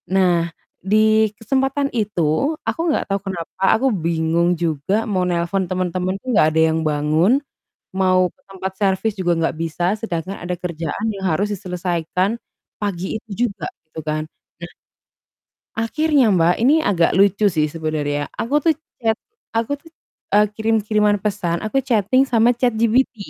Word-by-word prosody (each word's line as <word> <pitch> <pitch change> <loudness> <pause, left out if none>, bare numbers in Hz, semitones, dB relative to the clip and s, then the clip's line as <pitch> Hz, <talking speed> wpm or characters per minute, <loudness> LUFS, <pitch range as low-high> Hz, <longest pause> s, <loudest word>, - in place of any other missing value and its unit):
Nah, 180 -3 +2 0.3
di 215 +2 +3
kesempatan 270 +4 0
itu 210 - 0
aku - - -2
nggak 300 - 0
tahu 195 0 0
kenapa 170 -2 -7 0.2
aku 265 +4 +1
bingung 170 0 +1
juga 170 +6 0
mau 195 -4 0
nelpon 175 +2 -1
temen-temen 185 0 -1
tuh - - -19
nggak 155 - +5
ada 160 +1 +2
yang 160 - 0
bangun, 155 - +2 0.6
mau 185 -1 +3
ke 275 - -34
tempat 190 0 -5
servis 200 +2 +1
juga 175 -2 +1
nggak 165 - 0
bisa, 165 +1 -3
sedangkan 190 -3 -4
ada 180 +1 -4
kerjaan 170 +1 -4
yang 195 -2 -4
harus 190 +4 +1
diselesaikan 180 +2 -2 0.4
pagi 195 0 -3
itu 220 - -18 0.2
juga 195 -7 -7 0.2
gitu 160 - -8
kan. 155 0 -1 0.4
Nah 170 - -8 1.1
akhirnya 285 +3 +2
Mbak, 170 0 +4
ini 260 +5 +5
agak 170 -5 +2
lucu 200 +2 +4
sih 155 -5 +1
sebenarnya, 150 -2 -2
aku 250 +6 -1
tuh 325 - +4 0.3
chat 225 -2 +1 0.4
aku 230 +3 0
tuh, 325 - -17 0.5
eee, 210 0 +6
kirim-kiriman 215 -1 +2
pesan, 190 -5 -1
aku 215 +5 0
chatting 240 +1 +3
sama 235 -1 +4
ChatGPT. 240 +1 +2
190 Hz, 145 wpm, -20 LUFS, 170-220 Hz, 1.1 s, eee